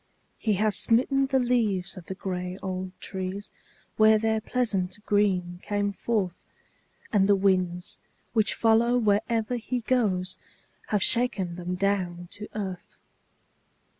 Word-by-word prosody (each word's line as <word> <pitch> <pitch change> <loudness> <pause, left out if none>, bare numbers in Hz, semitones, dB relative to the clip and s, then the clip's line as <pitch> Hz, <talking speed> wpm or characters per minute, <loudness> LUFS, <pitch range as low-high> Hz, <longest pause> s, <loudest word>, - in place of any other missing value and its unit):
He 215 - +1
has 210 +1 +1
smitten 270 +4 +2
the 265 0 +2
leaves 225 -7 +1
of 180 -2 -11
the 190 - -5
gray 180 -1 -4
old 185 -1 -3
trees 190 +1 -4 0.5
where 220 0 +6
their 220 0 0
pleasant 210 -7 -1
green 185 -4 +1
came 205 -1 -1
forth, 195 -4 -2 0.7
And 200 -1 +4
the 200 - +7
winds, 185 -2 0 0.3
which 220 -2 +2
follow 230 +2 +3
wherever 225 +2 +1
he 245 +2 -3
goes, 200 -7 0 0.5
have 205 -3 +1
shaken 210 -8 +1
them 180 +1 -4
down 180 -3 -1
to 210 0 -8
earth. 190 -4 -5
205 Hz, 130 wpm, -27 LUFS, 185-225 Hz, 0.7 s, the